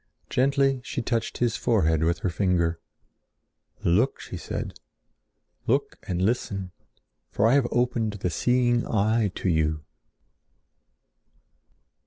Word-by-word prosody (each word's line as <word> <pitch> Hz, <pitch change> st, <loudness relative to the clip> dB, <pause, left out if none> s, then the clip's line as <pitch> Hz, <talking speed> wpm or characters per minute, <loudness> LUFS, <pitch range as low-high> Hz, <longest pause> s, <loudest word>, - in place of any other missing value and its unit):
Gently 135 Hz, 0 st, +2 dB
she 130 Hz, -2 st, -4 dB
touched 115 Hz, -1 st, -1 dB
his 120 Hz, -2 st, +1 dB
forehead 80 Hz, -10 st, +2 dB
with 85 Hz, +1 st, +1 dB
her -, -, +2 dB
finger. 85 Hz, -3 st, +1 dB, 1.0 s
"Look!" 110 Hz, +11 st, +2 dB
she -, -, -8 dB
said. -, -, -5 dB, 0.9 s
"Look -, -, 0 dB
and 90 Hz, -1 st, -1 dB
listen, 100 Hz, -4 st, -1 dB, 0.6 s
for 100 Hz, -, +1 dB
I 115 Hz, -, +5 dB
have 140 Hz, -3 st, +3 dB
opened 120 Hz, -3 st, 0 dB
the 95 Hz, -3 st, -3 dB
seeing 120 Hz, +7 st, +2 dB
eye 110 Hz, 0 st, +2 dB
to -, -, -3 dB
you." 80 Hz, -3 st, +1 dB
110 Hz, 115 wpm, -26 LUFS, 90-120 Hz, 1.0 s, I